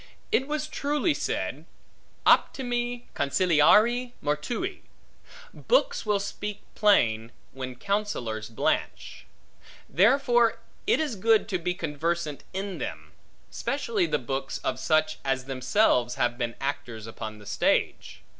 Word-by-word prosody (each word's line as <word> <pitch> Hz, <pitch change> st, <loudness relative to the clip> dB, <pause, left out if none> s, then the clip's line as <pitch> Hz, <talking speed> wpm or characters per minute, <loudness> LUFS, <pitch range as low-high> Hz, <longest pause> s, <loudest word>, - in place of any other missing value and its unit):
It 265 Hz, -, +2 dB
was 300 Hz, 0 st, -2 dB
truly 295 Hz, +2 st, 0 dB
said, -, -, -3 dB, 0.6 s
optimi 245 Hz, -1 st, +2 dB
consiliarii 195 Hz, -, +3 dB
mortui: 230 Hz, -, -2 dB, 0.7 s
books -, -, +1 dB
will 205 Hz, -1 st, +2 dB
speak 205 Hz, +1 st, -5 dB
plain, 115 Hz, -, +3 dB, 0.2 s
when 130 Hz, -1 st, -6 dB
counsellors 125 Hz, -, -2 dB
blanch. 115 Hz, -, -2 dB, 0.6 s
Therefore 240 Hz, -, +4 dB, 0.3 s
it 435 Hz, -, +4 dB
is 300 Hz, -7 st, -1 dB
good 220 Hz, +2 st, +3 dB
to 185 Hz, -4 st, -1 dB
be 180 Hz, +1 st, -2 dB
conversant 155 Hz, -1 st, -2 dB
in 195 Hz, 0 st, -4 dB
them, -, -, -6 dB, 0.4 s
specially 415 Hz, -7 st, -1 dB
the -, -, +1 dB
books 135 Hz, 0 st, -3 dB
of -, -, -1 dB
such 155 Hz, -1 st, +1 dB
as 130 Hz, -2 st, -1 dB
themselves 130 Hz, -, +2 dB
have 120 Hz, 0 st, +1 dB
been 120 Hz, -1 st, -3 dB
actors 135 Hz, -6 st, -4 dB
upon 110 Hz, -1 st, -7 dB
the 105 Hz, -, -14 dB
stage. 100 Hz, -, 0 dB
180 Hz, 115 wpm, -27 LUFS, -, 0.7 s, Therefore